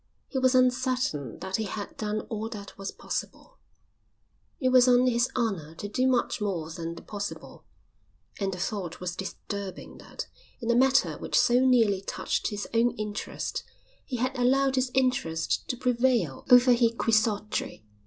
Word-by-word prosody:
He 265 - -2
was 260 0 +3
uncertain 255 - +1
that 190 0 -2
he 220 - -2
had 205 0 -6
done 215 0 -2
all 220 0 -5
that 205 -4 -9
was 195 0 -5
possible, - - -6 1.0
it 255 - +2
was 255 0 +6
on 250 0 +5
his 240 -1 +2
honour 190 -10 -2
to 205 - -6
do 250 +5 +1
much 250 -2 +1
more 175 -6 -2
than 165 +1 -5
the - - -11
possible, 205 -1 -7 0.7
and 195 -1 0
the 180 - -5
thought 185 -2 -4
was 180 -1 -4
disturbing 195 0 -6
that, - - -7 0.3
in 235 -1 0
a - - +3
matter 265 +2 +3
which - - -1
so 245 +1 +4
nearly 225 -7 +4
touched - - -2
his 205 -1 -4
own 235 +1 +3
interest, 210 -1 -4 0.4
he 260 - -5
had 255 +3 -1
allowed 265 +2 +3
his 255 -1 +1
interest 250 -12 0
to 250 - -2
prevail 240 - +1
over 250 0 +8
his 235 -1 +3
quixotry. 215 - 0
225 Hz, 165 wpm, -27 LUFS, 195-255 Hz, 1.0 s, over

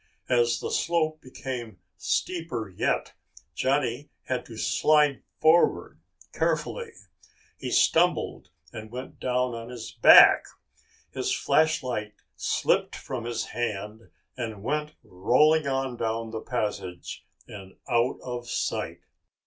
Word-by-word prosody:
As 120 -1 +2
the - - -4
slope 155 -2 0
became 125 -3 -7 0.2
steeper 165 - -2
yet, 95 - -1 0.4
Johnny 135 - 0
had 125 -1 -3
to 115 - -10
slide 150 +2 +3 0.2
forward 165 +2 +3 0.3
carefully. 470 -2 -1 0.6
He - - -6
stumbled 175 +2 +2 0.2
and 110 -1 -8
went 125 +3 -8
down 125 -1 0
on 115 0 -7
his 120 -3 -8
back. - - +8 0.7
His - - -2
flashlight 125 -9 +1 0.2
slipped - - 0
from 120 -3 -6
his 115 -1 -2
hand 110 -1 -4 0.3
and 110 -5 -5
went 150 +4 -2
rolling 140 +11 +3
on 135 -2 -1
down 115 0 -2
the 110 -1 -5
passage 105 -8 -4 0.2
and 95 -2 -11
out 120 -1 +1
of 120 -1 -6
sight. - - -2
125 Hz, 115 wpm, -26 LUFS, 115-145 Hz, 0.7 s, back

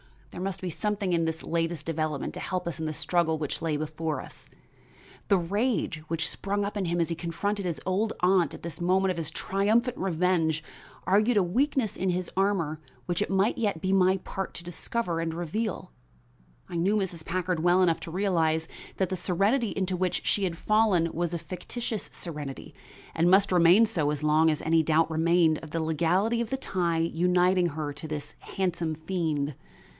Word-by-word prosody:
There 175 - -7
must 195 0 -3
be 185 -2 -3
something 205 0 -1
in 165 -1 +2
this 160 0 -3
latest 165 -2 -1
development 155 -3 -2
to - - -6
help 185 -2 -3
us 170 -1 -4
in 160 - -2
the 155 - -2
struggle 160 0 +1
which 150 -2 -4
lay 160 -2 0
before 155 -1 -3
us. - - -12 0.8
The 200 - +4
rage 200 0 0
which 160 -1 -1
sprang 200 +1 -2
up 205 - -4
in 195 - -1
him 170 0 0
as 170 - +1
he 165 - -1
confronted 185 +5 -2
his 170 -3 -3
old 200 +4 0
aunt 180 -1 +3
at - - -13
this 170 -1 -7
moment 190 +2 +3
of 180 - -4
his 160 -2 -2
triumphant 215 +9 +1
revenge 165 -3 +1 0.4
argued 210 +4 +3
a 200 - +5
weakness 245 +4 0
in 190 - -1
his 180 0 -2
armor 185 -6 +1 0.3
which 175 +2 -1
it - - 0
might 195 +3 +2
yet 205 -7 0
be 190 0 +1
my 190 0 +4
part 190 +1 -5
to 170 - -6
discover 175 +1 -3
and 165 -1 -2
reveal. 175 - -3 0.8
I 170 - -4
knew 190 +5 +2
Mrs. 180 -6 -2
Packard 180 0 -1
well 175 +3 +4
enough 165 -3 +2
to 165 - -7
realize 165 -4 +1 0.3
that 190 -2 +1
the 185 - -2
serenity 200 +7 +1
into 190 -2 -1
which 185 0 -1
she 200 - +2
had 170 -2 -3
fallen 205 -6 +2
was 170 0 -2
a - - 0
fictitious 190 +7 -5
serenity, 150 -5 -7 0.4
and 165 +2 +3
must 195 +2 +5
remain 180 +5 +6
so 155 -8 0
as 150 0 -2
long 155 +1 +4
as 155 - 0
any 165 0 +4
doubt 160 +1 +2
remained 160 0 +3
of 160 - -10
the 165 +1 -2
legality 180 +9 +1
of 235 - -3
the 265 - -1
tie 175 -9 -1
uniting 180 +2 +2
her 150 -2 -4
to 150 +2 -7
this 150 -1 -5
handsome 175 -4 -2
fiend. 155 -3 -2
175 Hz, 195 wpm, -28 LUFS, 160-195 Hz, 0.8 s, remain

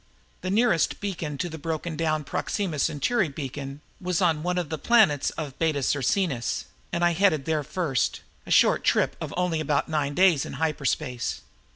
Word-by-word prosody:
The 185 - -3
nearest 215 -4 +2
beacon 170 -8 -4
to 175 - -2
the 160 -2 -7
broken 160 +1 -3
down 155 -1 0
Proxima 165 +3 -2
Centauri 155 - +1
Beacon 140 0 -6 0.2
was 180 -2 0
on 165 -4 +2
one 180 +2 -1
of 175 -4 -2
the 160 - -3
planets 210 - +4
of 145 -5 -5
Beta 155 -4 +1
Circinus 140 - 0 0.3
and 175 0 +1
I 175 - +4
headed 165 -5 +2
there 155 -2 0
first, 145 -5 -1 0.3
a - - -9
short - - +4
trip - - +2
of - - -4
only 180 -3 +1
about 150 -1 0
nine 145 -2 -1
days 180 -6 +4
in - - -7
hyperspace. 150 -5 -1
160 Hz, 175 wpm, -26 LUFS, 145-180 Hz, 0.3 s, planets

